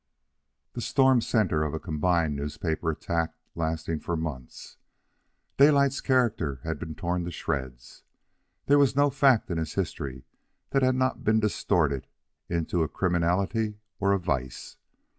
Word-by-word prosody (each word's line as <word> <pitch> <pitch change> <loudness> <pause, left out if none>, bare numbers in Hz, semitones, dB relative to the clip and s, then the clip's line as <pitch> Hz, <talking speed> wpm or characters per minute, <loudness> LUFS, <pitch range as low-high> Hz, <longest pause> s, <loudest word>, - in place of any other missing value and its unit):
The 120 - -5
storm 130 -1 +4
centre 105 -10 +1
of 75 0 -2
a - - -3
combined 80 -1 0
newspaper 80 +3 -2
attack 80 +1 -2 0.2
lasting 80 -1 -2
for 85 +1 -3
months, 75 -6 -7 0.8
Daylight's 140 -1 +4
character 115 - +1
had - - -3
been 80 - -6
torn 90 -1 -2
to - - -3
shreds. 65 -6 -5 0.6
There 145 +1 +5
was 140 -2 +3
no 145 0 +4
fact 135 -7 +3
in 85 - -1
his 80 -2 -4
history 65 -2 -4 0.5
that 135 - +2
had 130 0 +3
not 130 0 0
been 110 +1 +3
distorted 85 -9 0 0.4
into 85 0 -1
a 80 - +1
criminality 95 +5 0 0.2
or 100 0 +2
a 100 - +3
vice. 65 -9 -4
85 Hz, 140 wpm, -27 LUFS, 80-115 Hz, 0.8 s, There